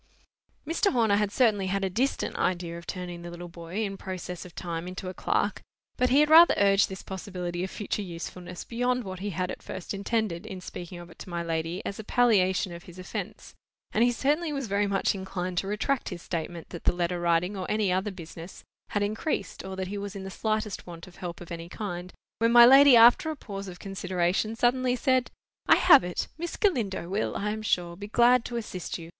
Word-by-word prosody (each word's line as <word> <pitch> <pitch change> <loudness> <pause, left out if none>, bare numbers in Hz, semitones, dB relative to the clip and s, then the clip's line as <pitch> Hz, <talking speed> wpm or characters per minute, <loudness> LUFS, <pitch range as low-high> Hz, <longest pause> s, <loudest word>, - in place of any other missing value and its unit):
Mr. 330 +6 +1
Horner 225 -5 +3
had 210 -1 0
certainly 210 -6 +2
had 195 +1 -1
a - - 0
distant 255 +9 -1
idea 175 -2 -1
of 170 -1 -10
turning 180 -2 -5
the 175 - -7
little 175 +1 -8
boy, 170 +5 -5
in 195 -2 -3
process 185 -2 -6
of 180 - -13
time, 170 -1 -4
into 185 0 -6
a - - -6
clerk; - - 0 0.3
but 250 - +2
he 275 +4 +5
had 300 - +3
rather 335 +2 +9
urged 200 0 +4
this 190 - -7
possibility 180 -2 -5
of 190 - -3
future 210 +1 -3
usefulness 175 0 -7
beyond 245 +1 -1
what 185 -2 -7
he 205 +2 -3
had 180 0 -2
at - - -8
first 185 +1 -6
intended, 200 -3 -2
in 190 - -6
speaking 175 -1 -8
of 175 0 -11
it - - -17
to - - -9
my 170 -1 -3
lady 165 +2 -3
as 200 - -4
a - - -5
palliation 195 -6 +2
of 170 0 -10
his 175 0 -13
offence, 185 - -6 0.4
and 225 - +3
he 245 - +4
certainly 300 +6 0
was 275 -2 -2
very 200 -1 +1
much 200 -1 +1
inclined 185 -2 -3
to 195 - -4
retract 225 +6 -1
his 175 -3 -7
statement 170 0 -5
that 170 - -9
the - - +5
letter 175 0 -1
writing, 175 +3 +1
or 185 -2 -5
any 210 -3 +1
other 190 +3 0
business, 170 -1 -10 0.3
had 205 - 0
increased, 215 +9 -2
or 190 0 -6
that 190 -1 -4
he 205 +1 -4
was 200 0 -6
in 195 - -6
the 190 - -6
slightest 215 -2 -2
want 170 -1 -9
of 185 -2 -16
help 175 -2 -6
of 175 - -10
any 170 0 -6
kind, 180 -3 -5 0.3
when 230 +1 +3
my 240 0 +10
lady 270 +1 +9
after 240 +7 +7
a 315 - -3
pause 200 -7 -7
of 180 -1 -8
consideration, 190 +2 -1
suddenly 250 +1 +2
said— 255 0 +1 0.4
"I - - +8
have 280 - +7
it. 180 0 -3
Miss 345 0 -4
Galindo 225 - 0
will, 200 +4 -1
I 210 +1 -1
am 215 0 -4
sure, 175 -5 0
be 200 +3 -8
glad 240 +2 +4
to 240 - -5
assist 190 -6 -5
you. 165 -1 -10
190 Hz, 220 wpm, -27 LUFS, 175-225 Hz, 0.4 s, my